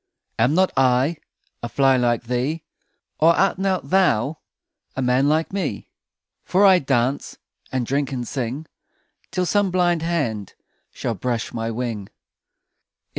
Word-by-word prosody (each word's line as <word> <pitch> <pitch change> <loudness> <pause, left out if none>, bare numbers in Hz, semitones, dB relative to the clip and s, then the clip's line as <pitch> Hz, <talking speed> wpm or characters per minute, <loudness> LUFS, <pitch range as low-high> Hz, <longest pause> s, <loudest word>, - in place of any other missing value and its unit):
Am 125 +7 +3
not 185 +1 +3
I 135 +4 +3 0.4
A 120 - -4
fly 135 0 +3
like 120 -2 +1
thee? 125 +7 -2 0.6
Or 165 +2 +5
art 195 -1 +2
not 190 -2 -1
thou 160 - +2 0.6
A 130 - -2
man 130 +3 +3
like 160 +4 0
me? 200 - -3 0.5
For 195 +3 +3
I 190 -2 +7
dance 135 -1 -1 0.3
And 130 -2 -1
drink, 140 +2 -1
and 125 -3 -4
sing, 130 +3 -4 0.6
Till 185 -1 -1
some 205 +1 +2
blind 175 -2 +1
hand 140 - -2 0.4
Shall 115 - -3
brush 115 +3 -3
my 115 -1 -2
wing. 115 -4 -4
135 Hz, 135 wpm, -22 LUFS, 120-170 Hz, 0.6 s, I